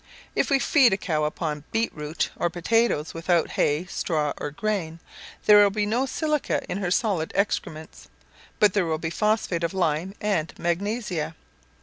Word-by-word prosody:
If - - +1
we 275 - +4
feed 270 -5 +4
a - - +1
cow 155 -6 -1
upon 150 -1 -3
beetroot, 160 -9 -2
or 175 - 0
potatoes, 175 -2 +1
without 165 0 +1
hay, 150 +4 +1
straw 155 -5 -1
or - - -3
grain, 165 -1 -3 0.5
there 210 0 +8
will 205 - +6
be 205 +1 -1
no 240 +6 0
silica 305 0 -1
in 195 - -3
her 185 -3 -1
solid 180 -4 0
excrements, 160 -6 -3 0.5
but 205 -3 +5
there 195 -5 +1
will 160 -1 0
be 160 +1 -4
phosphate 210 -4 0
of 170 +3 -1
lime 175 +2 0
and 195 -7 -1
magnesia. 175 -2 -2
180 Hz, 160 wpm, -25 LUFS, 160-210 Hz, 0.5 s, there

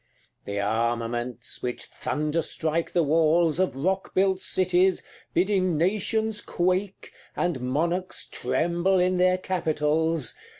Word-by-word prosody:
CLXXXI. - - -38
The 100 0 -3
armaments 115 +3 -2
which 125 -1 -4
thunderstrike 155 +1 -1
the 175 - +3
walls 160 +2 +3
Of 185 -7 +1
rock 190 +8 -1
built 190 0 +2
cities, 185 0 +2 0.3
bidding 185 -2 +2
nations 215 +4 0
quake, 185 +2 -1 0.2
And 175 -6 -1
monarchs 170 +8 -1
tremble 175 +8 0
in 180 0 +2
their 185 0 +4
capitals. 160 - 0
170 Hz, 115 wpm, -26 LUFS, 150-185 Hz, 0.3 s, their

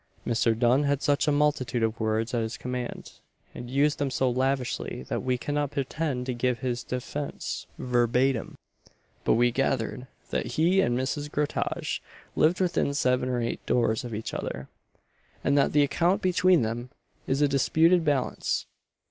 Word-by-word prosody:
Mr. 115 -1 +2
Dunn 125 +4 +3
had 140 0 0
such 145 +1 +2
a - - +4
multitude 145 -5 +1
of 115 0 -1
words 110 +2 0
at 120 - +1
his 110 0 -3
command, 125 -1 -6 0.3
and 120 - -8
used 145 +3 +2
them 140 -1 0
so 130 0 +1
lavishly, 130 - -1
that - - -1
we 125 -1 0
cannot 145 +2 -1
pretend 140 -1 -2
to 130 - -2
give 125 0 0
his 120 0 -3
defence 140 +3 -4
verbatim; 125 +1 +1 0.7
but - - +3
we 120 +1 +3
gathered, 130 -1 -1 0.2
that - - -2
he 175 +5 +4
and 120 -8 +1
Mrs. 145 +3 -2
Groutage 150 0 -2 0.3
lived 165 +3 +3
within 175 -6 +1
seven 125 -2 +1
or 125 -1 0
eight 115 - -3
doors 115 -2 +1
of 120 -3 -5
each 110 - -5
other, 65 0 -5 0.7
and 140 - +2
that 140 -1 +3
the 145 -1 +4
account 175 +7 +1
between 185 -3 +4
them 120 +3 -3 0.4
is 140 +2 +1
a - - +5
disputed 160 +5 +3
balance. 145 -4 0
130 Hz, 165 wpm, -27 LUFS, 120-145 Hz, 0.7 s, a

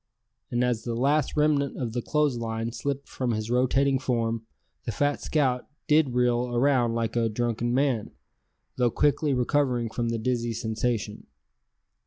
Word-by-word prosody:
and 120 +1 0
as 120 -3 0
the 120 -1 -3
last 140 +5 +1
remnant 150 -2 +2
of 120 -4 -3
the 120 - -1
clothes 150 0 +1
line 115 0 -3
slipped 140 +3 -3
from 125 -3 -2
his 110 +1 -3
rotating 135 +2 +2
form, 115 -3 -1 0.4
the 115 - -2
fat 145 +6 0
scout 130 -5 0 0.2
did 150 -5 +3
reel 125 0 +1
around 120 -2 +2
like 115 0 -1
a 115 -1 +2
drunken 120 +1 -1
man, 130 -4 +1 0.7
though 125 -1 +3
quickly 145 +4 +1
recovering 125 -2 +1
from 120 0 -1
the 115 - -1
dizzy 120 0 -1
sensation. 110 -1 -2
125 Hz, 155 wpm, -26 LUFS, 115-140 Hz, 0.7 s, did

